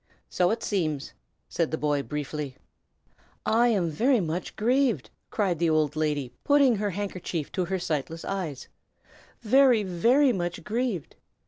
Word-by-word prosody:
"So 180 Hz, -1 st, +2 dB
it 225 Hz, +1 st, -2 dB
seems!" 155 Hz, -8 st, -2 dB, 0.3 s
said 165 Hz, -2 st, -1 dB
the 160 Hz, -, -2 dB
boy, 145 Hz, -2 st, 0 dB
briefly. 150 Hz, -1 st, -5 dB, 0.9 s
"I 235 Hz, +2 st, +4 dB
am 190 Hz, -8 st, +1 dB
very 240 Hz, -, +3 dB
much 175 Hz, 0 st, -3 dB
grieved!" 240 Hz, -, +1 dB, 0.2 s
cried 190 Hz, -7 st, 0 dB
the 170 Hz, -1 st, +2 dB
old 155 Hz, -1 st, +1 dB
lady, 145 Hz, -5 st, -1 dB
putting 280 Hz, -5 st, +4 dB
her 205 Hz, 0 st, -1 dB
handkerchief 185 Hz, -5 st, -4 dB
to 185 Hz, -, -1 dB
her 190 Hz, +2 st, -1 dB
sightless 165 Hz, -2 st, -3 dB
eyes, 175 Hz, -9 st, -4 dB, 0.7 s
"very, 250 Hz, -1 st, +5 dB
very 240 Hz, +10 st, +3 dB
much 175 Hz, -3 st, -3 dB
grieved! 220 Hz, -, -3 dB
180 Hz, 140 wpm, -27 LUFS, 155-225 Hz, 0.9 s, very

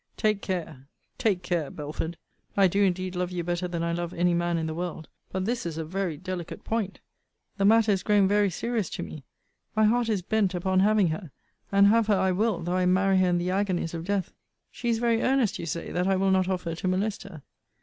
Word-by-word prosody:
Take 215 Hz, -2 st, +1 dB
care 165 Hz, -8 st, -4 dB, 0.3 s
take 195 Hz, -5 st, +1 dB
care, 170 Hz, -5 st, -1 dB
Belford 155 Hz, +3 st, -5 dB, 0.4 s
I 195 Hz, -1 st, +6 dB
do 195 Hz, +3 st, +1 dB
indeed 185 Hz, -1 st, 0 dB
love 180 Hz, 0 st, -1 dB
you 180 Hz, -1 st, -3 dB
better 175 Hz, +1 st, -2 dB
than 170 Hz, -1 st, -3 dB
I 170 Hz, 0 st, 0 dB
love 175 Hz, 0 st, -3 dB
any 175 Hz, +1 st, +2 dB
man 175 Hz, 0 st, 0 dB
in 160 Hz, -, -1 dB
the 160 Hz, -, -3 dB
world: 170 Hz, -2 st, -5 dB, 0.2 s
but 190 Hz, 0 st, -2 dB
this 235 Hz, +2 st, -1 dB
is 165 Hz, -2 st, -4 dB
a 160 Hz, -, -3 dB
very 180 Hz, -1 st, -2 dB
delicate 185 Hz, -1 st, -6 dB
point. 220 Hz, -4 st, -2 dB, 0.6 s
The 195 Hz, -, +2 dB
matter 220 Hz, +1 st, +5 dB
is 195 Hz, -2 st, +1 dB
grown 205 Hz, -2 st, +3 dB
very 205 Hz, 0 st, +3 dB
serious 220 Hz, +1 st, -2 dB
to -, -, -5 dB
me. 145 Hz, -4 st, -9 dB, 0.5 s
My 220 Hz, -, +3 dB
heart 230 Hz, +2 st, +3 dB
is 200 Hz, -5 st, 0 dB
bent 200 Hz, -1 st, +1 dB
upon 185 Hz, +1 st, +1 dB
having 205 Hz, -2 st, +4 dB
her. 160 Hz, +2 st, -4 dB, 0.4 s
And 200 Hz, 0 st, +6 dB
have 220 Hz, +2 st, +4 dB
her 205 Hz, -2 st, +3 dB
I 190 Hz, 0 st, +2 dB
will, 195 Hz, -2 st, 0 dB
though 175 Hz, +2 st, -1 dB
I 180 Hz, -1 st, +2 dB
marry 190 Hz, +1 st, +3 dB
her 185 Hz, -1 st, +3 dB
in 175 Hz, -, +2 dB
the 175 Hz, +1 st, -1 dB
agonies 185 Hz, -4 st, -1 dB
of 165 Hz, -1 st, -4 dB
death. 200 Hz, -1 st, -1 dB, 0.4 s
She 240 Hz, -, -3 dB
is 230 Hz, -, +2 dB
very 230 Hz, -1 st, +1 dB
earnest, 260 Hz, -5 st, +1 dB
you 170 Hz, -, -5 dB
say, 170 Hz, +1 st, -4 dB
that 180 Hz, +1 st, 0 dB
I 195 Hz, -, +3 dB
will 190 Hz, +1 st, +2 dB
not 190 Hz, 0 st, +2 dB
offer 180 Hz, -3 st, -2 dB
to 165 Hz, +3 st, -4 dB
molest 195 Hz, +3 st, 0 dB
her. 175 Hz, -7 st, -11 dB
185 Hz, 230 wpm, -27 LUFS, 175-205 Hz, 0.6 s, I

